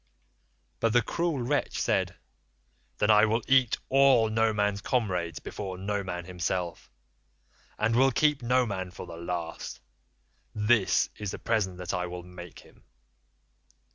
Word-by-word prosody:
"But 115 -1 +1
the 120 -1 +4
cruel 170 +2 -1
wretch 145 +4 -1
said, - - 0 0.8
'Then 105 - +3
I 105 0 +6
will 115 +1 0
eat 130 -4 +4
all 135 -4 +5
Noman's 105 -2 +1
comrades 90 -8 -1
before 95 -3 -6
Noman 95 -3 -3
himself, 90 -1 -3 0.9
and 115 +2 +1
will 135 +2 +5
keep 150 +2 +2
Noman 120 -7 0
for 90 - -9
the 85 -1 -9
last. 85 -1 -5 0.8
This 105 -1 +3
is 105 -2 -4
the - - -5
present 105 -6 -1
that 90 -1 -4
I 90 0 -1
will 90 0 -7
make 90 -1 -11
him. - - -21
105 Hz, 135 wpm, -28 LUFS, 90-120 Hz, 0.9 s, I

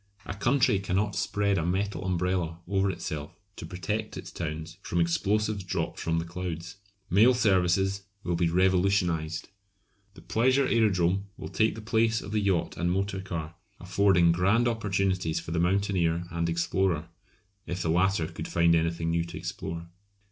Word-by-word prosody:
A - - -4
country 120 0 +2
cannot 100 +2 -1
spread 100 -2 +1
a - - -1
metal 95 +3 -1
umbrella 90 -2 -1
over 100 +1 +1
itself 75 -3 -5 0.2
to 80 - -8
protect 105 +5 -4
its - - -8
towns 80 0 -5
from 85 - -2
explosives 100 +4 +1
dropped 90 - -3
from 80 0 0
the 80 - -1
clouds. 90 +1 -6 0.3
Mail 110 +7 +6
services 95 -2 +2 0.2
will 90 - -1
be 85 0 +1
revolutionised. 90 -3 +1 0.7
The - - -14
pleasure 130 +4 +2
aerodrome 100 -5 +2
will - - -7
take 110 0 +1
the 110 - -7
place 110 0 +2
of 100 - -8
the 110 - +1
yacht 95 -4 0
and 85 0 0
motor 95 +1 -1
car, 85 -4 -5 0.3
affording 90 -1 +3
grand 100 +8 +3
opportunities 95 -7 0
for 80 - -8
the 85 - 0
mountaineer 90 -2 +1
and 85 0 -1
explorer 85 -1 0 0.6
(if 90 +1 -3
the 85 - -1
latter 90 0 +2
could 80 0 -6
find 85 0 +3
anything 85 0 +1
new 85 0 +1
to 85 - -8
explore). 85 +1 -5
90 Hz, 160 wpm, -28 LUFS, 85-100 Hz, 0.7 s, Mail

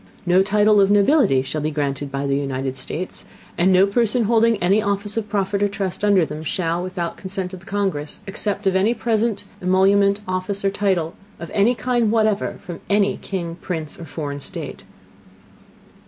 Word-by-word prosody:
No 180 +1 +4
Title 205 +1 +4
of 195 - +4
Nobility 205 - +4
shall 150 +3 -3
be 155 - 0
granted 145 -2 -2
by 140 +1 -2
the 140 0 +1
United 135 -1 -2
States; 160 +7 -5 0.3
and 180 +2 +3
no 185 +1 +6
Person 230 +3 +1
holding 230 +1 +3
any 195 +3 +2
Office 205 0 -2
of 220 -2 -3
Profit 200 -1 0
or 205 - +4
Trust 195 -1 -4
under 200 -5 +4
them, 150 +1 -7
shall, 170 +1 -1
without 180 -2 -4
the - - -16
Consent 190 -1 -4
of 185 - -7
the 185 - -20
Congress, 195 -5 -2
accept 205 +1 -2
of 190 -1 +2
any 205 +5 +3
present, 225 -2 0 0.2
Emolument, 200 +2 +3
Office, 185 +2 -3
or 195 - +3
Title, 190 -5 0 0.3
of 170 - -8
any 215 +5 +3
kind 240 -2 +1
whatever, 215 -2 +1
from 175 -2 -8
any 205 0 +3
King, 170 -3 -5
Prince, 160 -5 -5
or 170 - -7
foreign 145 -2 -5
State. - - -7
195 Hz, 185 wpm, -21 LUFS, 170-205 Hz, 0.3 s, no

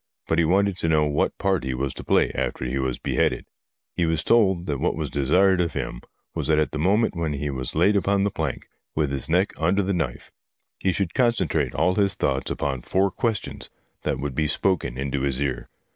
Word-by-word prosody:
But 80 - +1
he 85 - +4
wanted 95 +2 +2
to 85 - -1
know 75 -1 +3
what 75 -1 0
part 95 -6 0
he 65 -1 -2
was 65 +1 -2
to - - -8
play - - +2
after - - -2
he 65 +2 -2
was 65 -2 -1
beheaded. - - 0 0.5
He 85 - +1
was 80 -2 +1
told 95 -7 +3
that 70 -5 -2
what - - 0
was - - -3
desired 90 +7 +3
of 85 - -1
him - - -4 0.3
was 80 -4 -2
that 80 -1 +3
at 75 - +1
the 75 - -4
moment 100 +6 +2
when 80 -3 -1
he 70 +1 -3
was 65 -2 -3
laid 105 +1 +4
upon 100 0 +2
the 100 - +1
plank 80 -8 -3 0.3
with 75 -3 0
his 70 0 -2
neck 90 +5 +2
under 90 +5 +2
the 100 +1 0
knife, 80 -9 -3 0.5
he 95 - +1
should 95 -1 -1
concentrate 95 - +1
all 90 +3 +2
his 100 -1 +1
thoughts 65 -5 -1
upon 65 -3 -2
four 95 +6 +1
questions 115 -2 -3 0.3
that - - -1
would 70 0 -4
be 75 +3 0
spoken 75 -5 0
into 70 0 -2
his 65 -2 -1
ear. 70 -3 -2
80 Hz, 220 wpm, -24 LUFS, 70-95 Hz, 0.5 s, he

